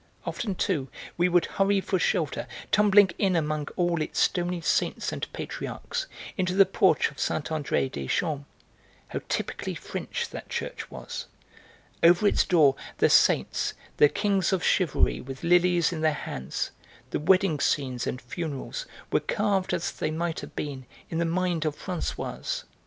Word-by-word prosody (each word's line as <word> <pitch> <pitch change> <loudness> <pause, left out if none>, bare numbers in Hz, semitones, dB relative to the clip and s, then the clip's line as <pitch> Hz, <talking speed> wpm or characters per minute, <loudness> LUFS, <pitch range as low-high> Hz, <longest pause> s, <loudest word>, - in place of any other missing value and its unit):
Often, 205 -5 -3
too, 135 -6 -1 0.3
we 175 +1 +3
would 175 -1 +4
hurry 195 0 +2
for 190 -1 -1
shelter, 165 -5 0 0.2
tumbling 205 -2 +6
in 190 -3 +2
among 155 -2 0
all 175 -2 +1
its 155 - -2
stony 175 -1 +1
saints 165 - 0
and - - -5
patriarchs, 485 +1 -4 0.3
into 185 -1 0
the 195 0 +7
porch 190 -6 +3
of 140 - -14
Saint 155 - -1
André 145 -4 0
des 70 -1 -5
Champs, 145 - -1 0.6
How - - -3
typically - - -2
French - - -4
that - - -8
church - - -4
was! - - -7 0.7
Over 175 +4 +6
its 205 - +4
door 155 -7 +5 0.2
the - - +4
saints, - - +3 0.2
the 150 - +7
kings 200 -1 +1
of 190 -3 0
chivalry - - +2
with 135 +3 -8
lilies 175 0 +4
in 160 - -4
their 155 -1 +3
hands, 65 - -4 0.4
the - - 0
wedding 185 -1 +3
scenes 130 -4 0
and 125 - -2
funerals 155 - -5 0.2
were - - +4
carved 200 -3 0
as 170 - -1
they - - -2
might 165 +1 -2
have - - -9
been 135 -4 -5 0.2
in 165 - -1
the 170 - +2
mind 175 -1 0
of 155 -2 -1
Françoise. 180 -3 -3
170 Hz, 160 wpm, -27 LUFS, 150-185 Hz, 0.7 s, the